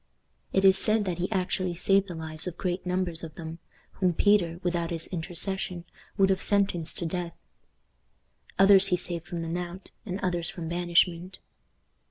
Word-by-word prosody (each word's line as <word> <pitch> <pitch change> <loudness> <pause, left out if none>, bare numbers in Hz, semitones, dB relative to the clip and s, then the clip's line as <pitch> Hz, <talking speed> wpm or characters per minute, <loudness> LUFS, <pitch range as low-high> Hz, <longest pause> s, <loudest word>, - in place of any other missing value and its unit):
It 195 0 +2
is 190 0 +7
said 215 -1 +3
that 180 -2 -3
he 180 +5 -2
actually 185 -2 -1
saved 195 +2 +2
the 175 - -7
lives 160 0 -4
of 175 - -6
great 180 0 -3
numbers 180 -2 -1
of 160 -2 -8
them, 165 0 -8 0.4
whom 185 -2 +2
Peter, 175 -5 +2
without 175 -2 -1
his 165 -1 +1
intercession, 180 +1 -2 0.3
would 195 -1 +4
have 190 - 0
sentenced 195 -5 0
to 170 - -2
death. 170 0 -4 1.2
Others 195 0 +7
he 180 - +1
saved 170 -2 -3
from 175 -3 -5
the 165 - -4
knout, 175 +2 -6
and 195 -4 -5
others 175 -3 +1
from 170 -3 -6
banishment. 175 +1 +1
180 Hz, 170 wpm, -27 LUFS, 170-190 Hz, 1.2 s, is